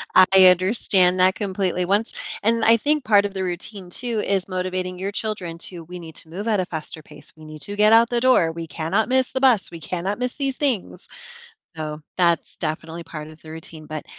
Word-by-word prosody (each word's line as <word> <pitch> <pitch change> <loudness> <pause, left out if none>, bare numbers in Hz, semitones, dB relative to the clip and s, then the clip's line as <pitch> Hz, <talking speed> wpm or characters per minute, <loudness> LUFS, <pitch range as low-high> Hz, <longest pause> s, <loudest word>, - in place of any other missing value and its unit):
I 185 - +9 0.2
understand 185 -1 +3
that 185 +1 +4
completely, 190 -3 -1
once 205 +4 0 0.3
and 230 +1 +2
I 230 +1 +6
think 295 +4 0
part 205 -3 +4
of 200 - -4
the 190 -1 -3
routine 185 +1 -5
too 235 +4 -3
is 195 -2 0
motivating 185 0 -3
your 195 +1 -3
children 200 -6 -4
to, 175 -2 -8
"We 180 +1 -9
need 160 -2 -11
to 160 - -13
move 200 +7 -6
at 210 -3 +2
a 185 - 0
faster 160 -1 -7
pace, 150 -1 -12
we 155 - -14
need 155 -1 -10
to 205 - -5
get 210 +1 +5
out 230 +1 +6
the 240 -1 0
door, 255 -11 +4
we 165 0 -7
cannot 170 +10 -1
miss 260 0 +2
the 260 - -2
bus, 250 -10 +3
we 170 - -8
cannot 180 +6 -3
miss 250 -1 -2
these 275 -2 -2
things," 260 -10 -2 0.7
so, 155 -1 -5 0.2
that's 170 -2 +1
definitely 160 +1 -4
part 155 -2 -8
of 155 0 -15
the 155 - -13
routine, 160 -1 -10
but 155 -1 -6
185 Hz, 215 wpm, -22 LUFS, 165-215 Hz, 0.7 s, I